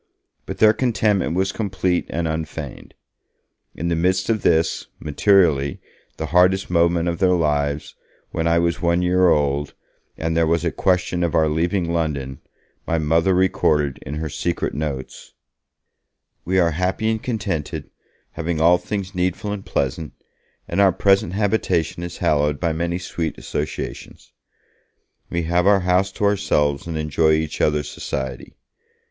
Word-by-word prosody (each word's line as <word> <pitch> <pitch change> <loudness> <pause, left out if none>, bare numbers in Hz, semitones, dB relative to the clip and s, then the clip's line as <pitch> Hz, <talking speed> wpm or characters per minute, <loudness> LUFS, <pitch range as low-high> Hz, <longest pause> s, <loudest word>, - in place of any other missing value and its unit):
But - - -5
their 110 0 +6
contentment 105 -8 +1
was 95 +1 +1
complete 95 -4 -1
and 85 0 -2
unfeigned. 80 -1 -6 0.8
In 85 - -3
the 85 - +1
midst 95 +5 +1
of 110 -3 0
this, 80 +1 +1
materially, 75 -4 +2 0.4
the 80 - -3
hardest 90 +1 +3
moment 85 0 +2
of 85 +1 -2
their 90 -2 +4
lives, 75 -3 -1 0.4
when 80 0 -1
I 85 0 +3
was 85 0 0
one 85 +1 +2
year 90 0 +3
old, 75 -1 0 0.4
and 80 0 -2
there 85 -1 +3
was 85 +1 +1
a 85 - +1
question 90 -1 0
of 85 0 0
our 80 -1 +4
leaving 85 +3 0
London, 70 -5 -2 0.5
my 80 - +1
Mother 80 +4 +2
recorded 75 -6 +1
in 75 - -6
her 80 +1 -3
secret 85 +3 -2
notes: 70 -3 -5 1.1
'We 95 +2 0
are 85 -2 +3
happy 90 +6 -1
and 110 -1 -2
contented, 100 - -3 0.4
having 80 0 -3
all 85 +2 +5
things 100 -2 -4
needful 90 +3 -1
and 100 -2 -5
pleasant, 80 -3 -2 0.5
and 90 +4 +1
our 95 -1 +6
present 95 -1 +2
habitation 95 -5 0
is 85 -1 -6
hallowed 75 -1 +1
by 85 -2 0
many 85 +2 -2
sweet 85 -4 -4
associations. 75 0 -6 1.0
We 85 0 -1
have 85 +3 +1
our 100 -1 +5
house 90 +2 +2
to - - -5
ourselves 75 -8 +1
and 80 -2 -3
enjoy 80 +1 +2
each 80 -1 -1
other's 75 -1 +1
society. 65 -1 -5
85 Hz, 150 wpm, -21 LUFS, 80-95 Hz, 1.1 s, their